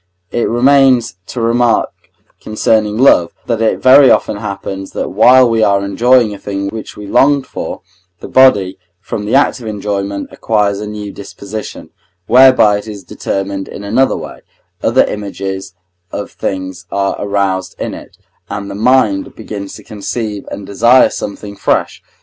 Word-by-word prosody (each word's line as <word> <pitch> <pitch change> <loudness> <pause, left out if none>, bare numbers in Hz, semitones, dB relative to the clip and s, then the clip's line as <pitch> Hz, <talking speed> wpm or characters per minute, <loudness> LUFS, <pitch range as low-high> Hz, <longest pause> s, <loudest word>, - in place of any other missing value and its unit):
It 120 - -1
remains 130 -4 +3
to 125 - -6
remark 115 +1 +1 0.5
concerning 110 0 0
love, 115 -9 +4
that 115 -2 -2
it 110 - 0
very 135 +1 +7
often 105 - +2
happens 100 -2 -6
that - - -3
while 125 +5 +5
we 115 -1 +1
are 100 -2 +2
enjoying 120 +2 +3
a 100 - -9
thing 100 -1 -4
which 110 +1 -8
we 105 - -8
longed 140 +6 +2
for, - - -6 0.4
the - - -9
body, 100 -8 +3 0.2
from 105 +1 -5
the 110 - 0
act 140 - +2
of 115 - -9
enjoyment, 100 -1 -3
acquires 105 -3 0
a 105 - -5
new 105 -1 -6
disposition, 100 +2 -8 0.3
whereby 125 -4 +5
it 105 - -11
is 105 -3 -8
determined 95 +1 -4
in 100 - -9
another 120 +6 +1
way, - - -9 0.4
other - - +3
images 95 -2 -5 0.4
of - - -5
things 95 -1 -5
are 100 0 -1
aroused 100 -2 -1
in - - -4
it, - - -12 0.3
and 100 -1 -5
the - - -6
mind 110 -2 +1
begins 105 -3 -7
to - - -12
conceive 105 0 -5
and 100 - -7
desire 120 +6 +4
something 100 0 -6
fresh. - - -1
105 Hz, 155 wpm, -14 LUFS, 100-120 Hz, 0.5 s, very